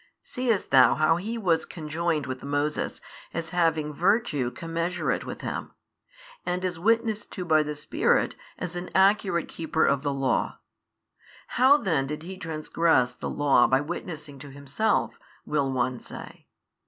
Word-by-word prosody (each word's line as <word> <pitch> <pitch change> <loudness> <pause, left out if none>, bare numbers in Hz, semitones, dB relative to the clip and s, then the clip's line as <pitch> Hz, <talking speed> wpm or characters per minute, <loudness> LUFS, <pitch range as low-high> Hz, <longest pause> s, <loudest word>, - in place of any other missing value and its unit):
Seest 240 -6 -1
thou 130 -3 +7
how 155 +1 +3
he 220 +6 -4
was 170 -7 +2
conjoined 160 -1 -2
with 130 0 -5
Moses 145 +2 -2 0.3
as 165 -1 -3
having 160 -3 +1
virtue 175 - +1
commensurate 165 +3 -2
with - - -6
him, - - -5 0.7
and 180 +1 -2
is 180 -2 -3
witnessed 225 +1 +1
to 180 - -4
by 155 -2 +4
the 150 0 -3
Spirit 150 - +1 0.2
as 180 -1 -4
an 175 +1 -5
accurate 190 -2 +3
keeper 160 -1 0
of 140 -1 +2
the 145 -1 -1
Law? 135 -1 0 0.9
How 260 +4 +5
then 160 - 0
did 150 +2 -5
he 190 +3 -7
trangress 155 -5 +1
the - - -3
Law 140 -4 +4
by 130 - +3
witnessing 155 -2 -6
to 145 - -9
himself, 140 - -1 0.3
will 140 -3 0
one 125 -1 -1
say? - - -11
160 Hz, 150 wpm, -26 LUFS, 145-180 Hz, 0.9 s, thou